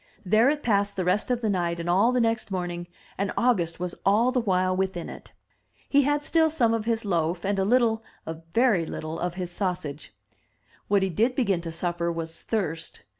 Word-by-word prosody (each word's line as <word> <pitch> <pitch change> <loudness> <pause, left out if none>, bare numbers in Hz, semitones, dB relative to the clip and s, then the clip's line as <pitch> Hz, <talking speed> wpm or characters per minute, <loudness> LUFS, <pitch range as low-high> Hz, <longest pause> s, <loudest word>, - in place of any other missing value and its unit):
There 220 +7 +4
it 295 0 -1
passed 200 -3 +1
the 185 - -2
rest 185 +6 +1
of 245 -1 0
the 220 - 0
night 175 -2 -1
and 170 - -4
all 195 +7 +4
the 250 - +1
next 230 -2 0
morning, 175 -2 -3 0.3
and 200 +1 0
August 180 -10 +1
was 180 0 -3
all 220 +6 +3
the 255 -1 +1
while 185 -3 +1
within 190 -2 -2
it. - - -11 0.6
He 285 - +4
had 290 +1 +1
still 320 +1 +3
some 245 -8 +2
of 225 -1 -1
his 230 -1 0
loaf, 170 -2 0
and 200 0 0
a - - +2
little 225 0 +2
— - - -35
a 160 - -3 0.2
very 220 -8 +3
little— 155 +1 -5
of 175 -1 -2
his 180 -1 -4
sausage. 175 - -4 0.8
What 200 -1 +3
he 190 - +1
did 230 +9 +1
begin 200 -9 +1
to 165 -1 -5
suffer 170 0 -2
was 165 -1 -5
thirst. 170 -7 -3
195 Hz, 210 wpm, -26 LUFS, 175-230 Hz, 0.8 s, There